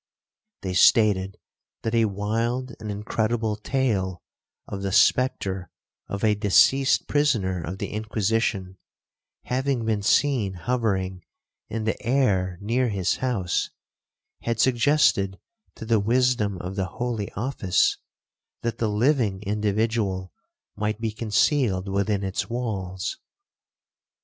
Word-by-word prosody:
They 95 -1 -2
stated 95 -1 +4 0.5
that 115 - -2
a 115 -1 +4
wild 115 +5 -1
and 110 -1 -6
incredible 110 +1 -1
tale 105 -6 -1 0.4
of 100 - -5
the 100 0 -2
spectre 95 -6 +2 0.4
of 100 +1 -5
a 110 -1 +4
deceased 115 +6 +4
prisoner 115 - +1
of 90 +5 -5
the - - -4
Inquisition 105 -3 -1 0.6
having 130 -2 -1
been 110 -2 0
seen 110 -2 +2
hovering 95 -4 -1 0.5
in 110 0 -3
the 110 - -2
air 100 -8 +1
near 120 +4 +1
his 95 -4 0
house, 105 -9 -1 0.7
had 115 -1 -2
suggested 120 -6 +3 0.4
to - - -8
the 110 -1 +3
wisdom 115 -2 +1
of 90 +2 -6
the 95 -2 0
holy 120 -4 -2
office, 100 -5 +1 0.7
that 115 -1 -2
the 110 - +1
living 105 -3 +1
individual 105 -2 -1 0.4
might 105 +1 -2
be 115 -1 -2
concealed 110 -2 +1
within 100 +1 0
its 95 +4 -2
walls. 95 -7 -3
105 Hz, 115 wpm, -25 LUFS, 95-120 Hz, 0.7 s, stated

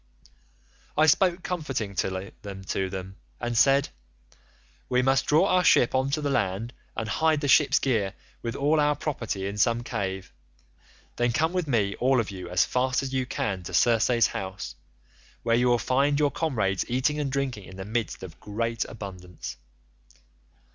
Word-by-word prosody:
"I 155 - +6
spoke 175 +3 +3
comfortingly 105 - -3
to 95 -1 -4
them 95 0 -7 0.2
and 120 0 -2
said, 135 +4 +4 1.0
'We 125 0 +2
must 135 +1 +2
draw 155 +5 +5
our 185 -2 +3
ship 120 - +5
on 130 +1 +1
to 150 +2 -1
the 145 - -1
land, 110 0 -1 0.2
and 110 - -2
hide 155 +7 +2
the 145 - -1
ship's 145 +1 +5
gear 110 -8 0 0.3
with 115 +1 -4
all 150 +3 +2
our 150 0 +3
property 115 -10 -3
in 100 +1 -4
some 115 +2 +2
cave; 95 -5 -4 0.8
then 120 0 +2
come 160 +8 +1
with 180 -4 -1
me 105 -7 +1
all 130 +1 +3
of 110 -3 -2
you 90 -2 -7
as 90 0 +3
fast 130 +1 0
as 135 0 -4
you 130 -1 0
can 95 -6 -2
to 85 - -5
Circe's 115 0 +4
house, 95 0 -5 0.7
where 115 0 +3
you 125 +1 +3
will 120 -1 +4
find 140 +5 +2
your 145 -1 +3
comrades 105 - 0
eating 130 +5 0
and 140 -2 -1
drinking 135 -7 -2
in 95 - -11
the 95 - -6
midst 110 -1 -3
of 90 -4 -10
great 115 +2 -2
abundance. 90 - -8
120 Hz, 170 wpm, -26 LUFS, 100-140 Hz, 1.0 s, I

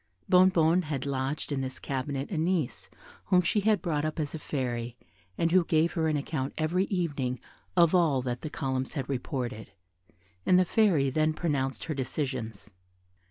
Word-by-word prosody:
Bonnebonne 180 -2 +5
had 145 -3 -3
lodged 140 +2 -2
in 140 -2 -1
this 130 -1 -4
cabinet 135 +2 -3
a 180 - -2
niece 165 -5 -1 0.4
whom 185 - +4
she 180 +4 +1
had 210 -3 +2
brought 150 -4 0
up 155 +1 -2
as 150 -2 -2
a 160 - -4
fairy, 125 -4 -3 0.4
and 165 - +1
who 185 0 +5
gave 165 0 +2
her 160 -2 +1
an 155 -1 +1
account 140 -2 -3
every 170 +4 +1
evening 145 - -2 0.4
of 170 -1 +5
all 155 -8 +3
that 125 0 -3
the 155 - -4
columns 130 0 -3
had 135 -3 -2
reported, 125 -3 -4 0.7
and 180 - +5
the 185 - +4
Fairy 170 -10 +3
then 155 +2 +2
pronounced 140 -6 -1
her 160 - -3
decisions. 130 -6 -4
150 Hz, 170 wpm, -29 LUFS, 130-170 Hz, 0.7 s, Bonnebonne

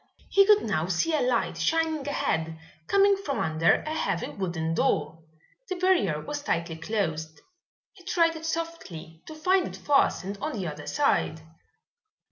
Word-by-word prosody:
He 395 0 +5
could 420 -1 +6
now 165 -6 -1
see 190 - 0
a 305 - +2
light 250 0 0
shining 320 -3 0
ahead, 160 - -1 0.3
coming 400 0 +5
from 300 -8 -3
under 160 +1 +2
a 310 - -3
heavy 175 - -1
wooden 170 -4 -3
door. 155 0 0 0.5
The 370 - -1
barrier 355 - +2
was 295 - -5
tightly 170 - -2
closed. 160 -4 -3 0.5
He 365 - -18
tried 335 -2 +2
it 320 0 -6
softly, 320 - -5
to 315 - -8
find 365 +4 +2
it - - -8
fastened 200 -8 +1
on 305 +1 -2
the 200 -6 -3
other 150 -2 -6
side. 280 - +1
255 Hz, 155 wpm, -27 LUFS, -, 0.5 s, could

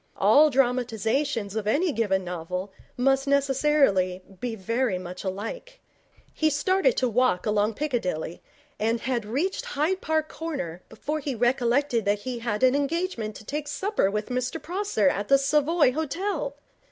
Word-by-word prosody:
All 305 +2 +6
dramatizations 245 -3 0
of 215 -2 -2
any 315 +10 +2
given 200 -7 0
novel 180 +2 -4 0.3
must 270 +2 +2
necessarily 270 -10 +2 0.2
be 245 -2 -3
very 230 +1 0
much 180 0 -7
alike. 225 - -5 0.5
He 315 - +2
started 375 - +2
to 255 - +2
walk 240 -5 +2
along 210 0 +1
Piccadilly, 185 - -2 0.4
and 225 +2 0
had 240 -4 -1
reached 300 - -1
Hyde 320 +6 -1
Park 315 -1 0
Corner 275 - -5
before 295 +8 -3
he 275 -3 -3
recollected 245 +1 +2
that 205 0 +1
he 245 +1 -4
had 230 0 -2
an 255 0 +6
engagement 285 - -1
to 215 - -11
take 295 +4 -4
supper 380 - 0
with 210 +3 -3
Mr 255 +5 -2
Prosser 350 - 0
at 200 +2 0
the 275 - +6
Savoy 295 +1 +3
Hotel. 315 +1 -2
255 Hz, 150 wpm, -26 LUFS, 210-300 Hz, 0.5 s, All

